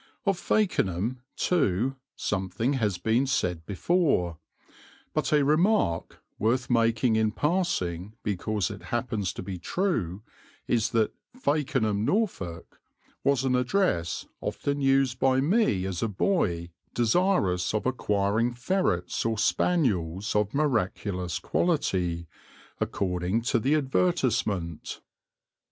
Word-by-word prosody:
Of 195 Hz, -3 st, +1 dB
Fakenham, 120 Hz, -, 0 dB
too, 135 Hz, -, +1 dB, 0.2 s
something 100 Hz, +6 st, -1 dB
has 105 Hz, -8 st, 0 dB
been 115 Hz, +8 st, +1 dB
said 90 Hz, -10 st, -1 dB
before; 100 Hz, -, +1 dB, 0.7 s
but -, -, 0 dB
a 150 Hz, -2 st, +4 dB
remark, 155 Hz, -, +2 dB, 0.2 s
worth 125 Hz, +3 st, +1 dB
making 115 Hz, 0 st, +3 dB
in 110 Hz, -1 st, +2 dB
passing 105 Hz, -, -1 dB
because 105 Hz, 0 st, -1 dB
it 100 Hz, -4 st, -9 dB
happens 115 Hz, -6 st, -1 dB
to -, -, -6 dB
be 90 Hz, -1 st, -5 dB
true, 105 Hz, -, -1 dB, 0.4 s
is 115 Hz, -2 st, +2 dB
that 110 Hz, -2 st, +1 dB, 0.2 s
"Fakenham, 135 Hz, -, 0 dB
Norfolk," 110 Hz, -, -2 dB, 0.4 s
was 140 Hz, -2 st, +2 dB
an 130 Hz, -1 st, +2 dB
address 125 Hz, -, 0 dB
often 140 Hz, 0 st, -2 dB
used 135 Hz, -2 st, +2 dB
by 130 Hz, 0 st, +3 dB
me 145 Hz, -, +2 dB
as 95 Hz, -2 st, -3 dB
a 115 Hz, -, +1 dB
boy 95 Hz, -, 0 dB, 0.2 s
desirous 115 Hz, -, +2 dB
of 110 Hz, -, -1 dB
acquiring 110 Hz, -1 st, +1 dB
ferrets 125 Hz, -, 0 dB
or 115 Hz, -1 st, 0 dB
spaniels 105 Hz, -, +1 dB
of 105 Hz, -1 st, +2 dB
miraculous 100 Hz, -, 0 dB
quality, 90 Hz, -, 0 dB, 0.5 s
according 90 Hz, +3 st, -1 dB
to 115 Hz, -, +2 dB
the 135 Hz, +7 st, +2 dB
advertisement. 120 Hz, -, 0 dB
115 Hz, 110 wpm, -27 LUFS, 95-140 Hz, 0.7 s, a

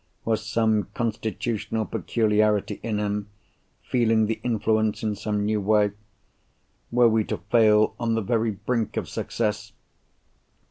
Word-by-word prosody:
Was 110 Hz, -1 st, 0 dB
some 110 Hz, -1 st, +1 dB
constitutional 110 Hz, -1 st, -2 dB
peculiarity 105 Hz, -2 st, +1 dB
in 110 Hz, -2 st, -2 dB
him, 105 Hz, 0 st, -2 dB, 0.5 s
feeling 115 Hz, -3 st, +2 dB
the 110 Hz, +1 st, -2 dB
influence 110 Hz, -2 st, 0 dB
in 110 Hz, -1 st, 0 dB
some 105 Hz, 0 st, -2 dB
new 105 Hz, 0 st, 0 dB
way? 105 Hz, 0 st, +3 dB, 1.0 s
Were 120 Hz, 0 st, +5 dB
we 110 Hz, -1 st, +2 dB
to -, -, -3 dB
fail 110 Hz, -2 st, +5 dB
on 115 Hz, -1 st, 0 dB
the 115 Hz, -, 0 dB
very 115 Hz, +2 st, +1 dB
brink 110 Hz, +2 st, -2 dB
of -, -, -2 dB
success? 105 Hz, -2 st, -3 dB
110 Hz, 130 wpm, -25 LUFS, 105-115 Hz, 1.0 s, Were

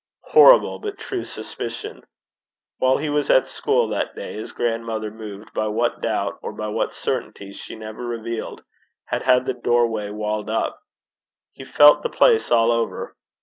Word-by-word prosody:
Horrible, -, -, +6 dB
but 415 Hz, -1 st, -6 dB
true 380 Hz, -2 st, -4 dB
suspicion! 430 Hz, +2 st, -7 dB, 0.8 s
While 130 Hz, 0 st, +3 dB
he 155 Hz, -, -3 dB
was 145 Hz, -1 st, 0 dB
at 130 Hz, -, +4 dB
school -, -, 0 dB
that -, -, -2 dB
day, -, -, -7 dB
his 110 Hz, -, -7 dB
grandmother, 115 Hz, -2 st, -2 dB
moved 105 Hz, -1 st, -10 dB
by 110 Hz, -, -1 dB
what 115 Hz, +3 st, -1 dB
doubt -, -, -2 dB
or -, -, -6 dB
by 105 Hz, 0 st, -5 dB
what 105 Hz, -, -1 dB
certainty 100 Hz, 0 st, -4 dB
she -, -, -9 dB
never 110 Hz, +2 st, -8 dB
revealed, 115 Hz, -1 st, -5 dB, 0.4 s
had -, -, -2 dB
had 125 Hz, 0 st, +3 dB
the 130 Hz, -, -1 dB
doorway 120 Hz, -3 st, 0 dB
walled 105 Hz, 0 st, -3 dB
up. 110 Hz, -, -2 dB, 0.7 s
He 130 Hz, -, -11 dB
felt 145 Hz, +2 st, +6 dB
the 480 Hz, -, -2 dB
place 450 Hz, -2 st, +3 dB
all 115 Hz, 0 st, +4 dB
over. 115 Hz, -1 st, -2 dB
115 Hz, 160 wpm, -22 LUFS, 110-130 Hz, 0.8 s, Horrible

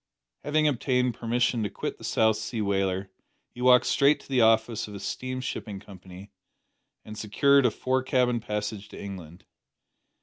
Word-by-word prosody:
Having 155 Hz, +1 st, +2 dB
obtained 125 Hz, -2 st, +1 dB
permission 120 Hz, 0 st, 0 dB
to 105 Hz, -, -1 dB
quit -, -, -5 dB
the -, -, -13 dB
South 110 Hz, -1 st, +2 dB
Sea 110 Hz, +2 st, -5 dB
whaler 95 Hz, -1 st, -1 dB, 0.4 s
he 120 Hz, -, -9 dB
walked 125 Hz, 0 st, +6 dB
straight 140 Hz, +2 st, +3 dB
to -, -, -18 dB
the 130 Hz, -3 st, +2 dB
office 110 Hz, 0 st, +2 dB
of 105 Hz, -, -9 dB
a -, -, -7 dB
steam 130 Hz, +4 st, -4 dB
shipping 105 Hz, -5 st, -5 dB
company, 95 Hz, 0 st, -13 dB, 0.7 s
and 110 Hz, -, -9 dB
secured 135 Hz, +6 st, +3 dB
a -, -, +3 dB
fore 130 Hz, +4 st, -1 dB
cabin 125 Hz, -2 st, +1 dB
passage 105 Hz, -2 st, -4 dB
to -, -, -11 dB
England. 90 Hz, -4 st, -9 dB
110 Hz, 165 wpm, -27 LUFS, 100-125 Hz, 0.7 s, walked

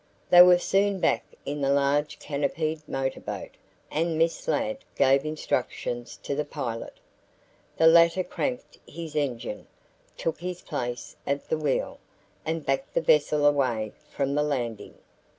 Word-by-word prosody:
They 175 Hz, -, +10 dB
were 180 Hz, 0 st, +8 dB
soon 195 Hz, +2 st, +1 dB
back -, -, +2 dB, 0.2 s
in 145 Hz, +1 st, -3 dB
the 135 Hz, -, +1 dB
large 140 Hz, +2 st, +2 dB
canopied 155 Hz, +2 st, -2 dB
motorboat, 135 Hz, 0 st, -3 dB, 0.4 s
and 165 Hz, +1 st, 0 dB
Miss 165 Hz, +1 st, 0 dB
Ladd 270 Hz, -1 st, 0 dB, 0.2 s
gave 135 Hz, 0 st, +4 dB
instructions 125 Hz, -5 st, -3 dB
to -, -, -2 dB
the 150 Hz, +2 st, 0 dB
pilot. 130 Hz, -6 st, -5 dB, 0.8 s
The 160 Hz, -, +4 dB
latter 170 Hz, +2 st, +6 dB
cranked 255 Hz, +6 st, -4 dB
his 165 Hz, -2 st, -8 dB
engine, 125 Hz, -7 st, -3 dB, 0.5 s
took 165 Hz, -, -2 dB
his 180 Hz, +1 st, -5 dB
place 125 Hz, -6 st, -4 dB
at 140 Hz, 0 st, -2 dB
the 160 Hz, -, +1 dB
wheel, 145 Hz, -3 st, -1 dB, 0.5 s
and 160 Hz, -1 st, -2 dB
backed 135 Hz, 0 st, -1 dB
the -, -, +3 dB
vessel 150 Hz, -1 st, +3 dB
away 125 Hz, -7 st, +2 dB, 0.2 s
from 140 Hz, -1 st, -1 dB
the 150 Hz, -, +2 dB
landing. 125 Hz, -7 st, -3 dB
150 Hz, 140 wpm, -27 LUFS, 135-165 Hz, 0.8 s, They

